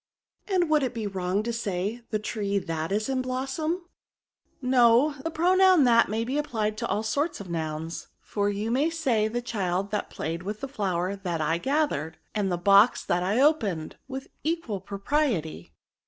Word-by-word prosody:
*^ - - -8
And 350 -2 +3
would 310 -1 +3
it 255 -2 -2
be 225 -2 -3
wrong 190 0 -1
to 235 +1 -2
say, 210 0 -2
the 215 - 0
tree 205 -2 -2
that 165 -3 -3
is 210 +2 0
in 265 -1 0
blossom 265 +5 -2
?" - - -1
^' - - -18 0.8
No: 250 +2 +4
the 325 - -1
pronoun 365 +1 +5
that 235 -2 +5
may 220 +2 -1
be 265 +5 -1
applied 220 -7 -1
to 235 - -2
all 210 - -1
sorts 285 +9 -1
of 190 -4 -8
nouns, 160 0 -4
for 205 -1 -1
you 205 +3 -2
may 280 +6 +2
say 260 -10 +1
the 240 +2 -3
child 195 -4 -2
that 210 - -2
played 165 +2 -4
with 210 +3 -5
the 275 - -3
flower 190 -7 -1
that 180 -4 -3
I 160 +2 +1
gathered, 265 - 0 0.2
and 205 -3 0
the 175 - 0
box 200 +6 +5
that 175 - +1
I 195 +6 +1
opened, 215 - +1
with 265 0 -6
equal 310 - -2
propriety. 195 - -1
215 Hz, 190 wpm, -27 LUFS, 190-270 Hz, 0.8 s, pronoun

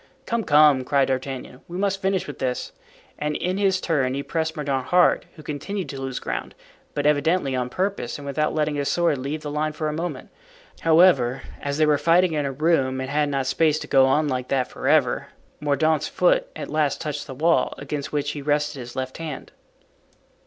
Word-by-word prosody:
"Come, 235 -1 -1
come," 150 -4 +5
cried 140 +1 +2
D'Artagnan, 130 -1 -4
"we 175 - -6
must 195 0 0
finish 190 0 0
with 145 - -8
this," 130 - -2 0.5
and 150 0 -1
in 185 +5 -1
his 190 -2 +2
turn 135 -6 0
he 140 - -3
pressed 160 +1 -2
Mordaunt 135 -4 -2
hard, 180 0 +3
who 155 - -12
continued 170 +7 -4
to 135 -1 -6
lose 135 -1 -4
ground, - - -4 0.4
but 145 -1 -1
evidently 150 -1 +2
on 125 -1 -1
purpose 190 -4 -2
and 145 - -10
without 150 +2 0
letting 155 -1 +1
his 145 -1 -1
sword 170 -5 +1
leave 145 +4 -4
the 145 - -4
line 155 +1 -1
for 155 0 -2
a - - -3
moment. 170 +3 -5 0.5
However, 160 -7 +4 0.2
as 140 0 -2
they 155 - +4
were 150 -1 +3
fighting 170 +1 +3
in 145 -2 0
a - - -2
room 135 -3 +1
and 130 +1 -4
had 150 0 +1
not 135 -2 -1
space 155 +3 +2
to - - -5
go 135 -1 +4
on 150 +3 +2
like 130 -2 -2
that 130 -2 0
forever, - - +1 0.3
Mordaunt's 150 +1 +1
foot - - +2
at - - -5
last 155 -2 +1
touched 150 -2 -4
the 130 - -7
wall, 155 -1 +2
against 145 +1 -5
which 145 -1 -1
he 145 - -6
rested 150 0 0
his 120 -1 -8
left 130 +2 -4
hand. 160 -3 -6
150 Hz, 200 wpm, -24 LUFS, 135-160 Hz, 0.5 s, come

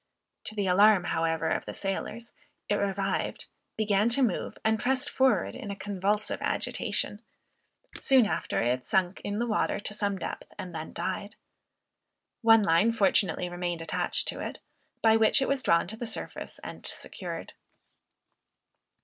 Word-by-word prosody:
To 215 - -1
the 205 -2 0
alarm, 195 +1 +6
however, 165 -1 0
of - - -1
the - - -6
sailors, 220 +4 -4 0.3
it - - +1
revived, 195 -1 -1 0.3
began 210 0 +2
to 260 +3 +3
move, 220 -8 -1
and 220 0 +3
pressed 260 0 +1
forward 265 -1 +2
in 215 - -7
a 200 - -3
convulsive 200 +1 -1
agitation; - - -1 0.8
soon 260 -4 +5
after 205 - -1
it 125 +1 0
sunk 185 -1 +1
in 205 0 -2
the 235 - 0
water 220 -3 0
to 210 - -3
some 205 -2 -1
depth, - - -6
and 180 -1 -7
then 160 -1 -5
died. 200 +2 -4 1.1
One 225 -1 +6
line 180 +5 +4
fortunately 195 -3 +2
remained 175 -1 -3
attached - - -1
to - - -5
it, - - -5 0.5
by 225 0 +6
which 220 -1 +5
it 270 - +1
was 275 -1 +1
drawn 170 -7 +3
to 220 - -7
the 240 - -4
surface 220 - -6
and - - -8
secured. - - -5
205 Hz, 155 wpm, -28 LUFS, 180-225 Hz, 1.1 s, alarm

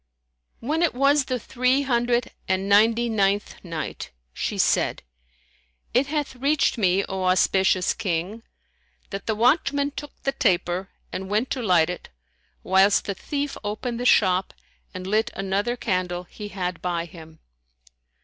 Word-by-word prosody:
When 305 +7 -1
it 340 -7 +2
was 275 +2 +3
the 255 - -1
Three 255 +4 +1
Hundred 240 -2 +1 0.2
and 190 +1 0
Ninety 225 +4 +4
ninth 205 -2 0
Night, 165 -4 -5 0.2
She - - -3
said, - - +1 0.9
It 255 +4 +3
hath 295 -2 -2
reached 280 +3 +2
me, 195 -3 +2
O 190 -1 -3
auspicious 185 0 +3
King, 195 +1 -3 0.7
that 195 0 -6
the 220 - +1
watchman 280 +4 +2
took 285 +1 -9
the 275 - +1
taper 180 -3 0 0.2
and 190 0 -5
went 215 +5 0
to 260 - -1
light 180 -6 +3
it, 180 - -8 0.5
whilst 190 +2 +4
the 200 - -2
thief 285 +7 -4
opened 230 +3 -3
the 245 - -3
shop 185 -4 +3 0.4
and 185 0 -7
lit 215 +4 +1
another 200 +5 -1
candle 180 -5 -1
he 205 +4 -9
had 180 -3 -4
by 170 -2 -2
him. 160 -1 -13
205 Hz, 145 wpm, -24 LUFS, 185-250 Hz, 0.9 s, Ninety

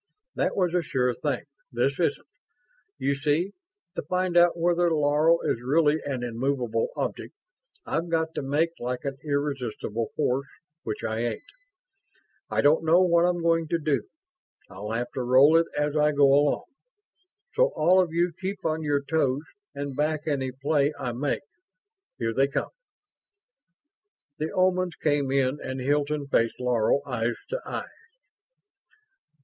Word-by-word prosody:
"That - - -1
was 180 -3 +1
a 180 - +2
sure 125 -5 0
thing. - - -2 0.3
This - - 0
isn't. - - 0 0.7
You 140 0 0
see, 150 +7 0 0.4
to - - -3
find 185 -1 -1
out 175 0 +5
whether 175 +1 +2
Laro 155 +2 +3
is 115 - -1
really 150 +4 +2
an 130 -3 -3
immovable 125 - -1
object, - - -4 0.5
I've 165 +1 -2
got 160 -1 0
to - - -3
make 145 +5 +1
like 125 +2 -4
an 135 -1 -4
irresistible 135 -6 -2
force, 135 +3 0 0.3
which 110 - -5
I 110 0 -2
ain't. 120 - -2 1.1
I - - +1
don't 150 +3 +4
know 165 +2 +5
what 170 -1 +4
I'm 175 -1 0
going 165 -1 +2
to 170 - +1
do; 150 -3 -1 0.6
I'll 100 +2 -7
have 120 +2 -2
to 130 - -3
roll 130 +5 +6
it 165 0 +4
as 150 0 0
I 150 0 +3
go 145 0 +5
along. 145 0 +2 0.9
So - - +3
all 180 +4 +5
of 175 -3 -1
you 170 +1 +1
keep 190 0 -4
on 160 0 0
your 145 -2 0
toes 140 -2 0 0.3
and 140 -1 -4
back 155 +1 -1
any 135 -4 -1
play 140 +2 +1
I 125 - -2
make. 135 +5 -2 0.7
Here 115 -1 -1
they 135 +3 +3
come." 140 - -3 1.7
The 155 +1 -2
Omans 185 -2 +1
came 145 -3 +1
in 135 +1 +1
and 130 0 -4
Hilton 145 +2 0
faced 115 -4 +1
Laro, 125 +1 +2
eyes 120 -3 -1
to - - -3
eyes. - - -7
145 Hz, 155 wpm, -26 LUFS, 130-165 Hz, 1.7 s, roll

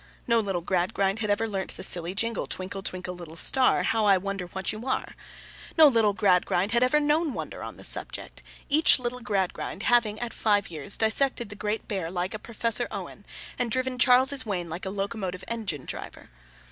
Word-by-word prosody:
No 235 -1 +3
little 195 -5 -1
Gradgrind 190 +3 0
had 215 -1 -2
ever 205 +2 +1
learnt 195 -3 -4
the - - -5
silly 175 +1 +1
jingle, 230 +3 -1
Twinkle, 190 +1 -5
twinkle, 185 -1 -4
little 170 -3 -10
star; 260 +9 +5
how 225 -1 +1
I 200 -2 +6
wonder 195 -1 -4
what 190 +1 -2
you 220 +4 -7
are! 260 - -2 0.6
No 320 - +9
little 225 -7 +4
Gradgrind 185 0 +2
had 235 +1 +2
ever 255 +4 +4
known 300 0 +1
wonder - - -6
on - - -7
the - - -12
subject, - - -6 0.3
each 310 +2 +6
little 250 -1 -4
Gradgrind 195 -2 -2
having 225 -3 +2
at 240 -1 -4
five 205 -4 +1
years 155 +3 -4
old - - -5
dissected 235 +1 +1
the 205 - -8
Great 210 +1 -3
Bear 190 -5 -3
like 180 +2 -3
a 215 - -5
Professor 230 0 -1
Owen, - - -8 0.3
and 245 - 0
driven 255 +1 -2
Charles's 260 +2 +5
Wain 180 -6 -3
like 175 +4 -5
a - - -2
locomotive 195 -2 -4
engine 210 - -4
driver. - - -8
210 Hz, 195 wpm, -26 LUFS, 190-240 Hz, 0.6 s, No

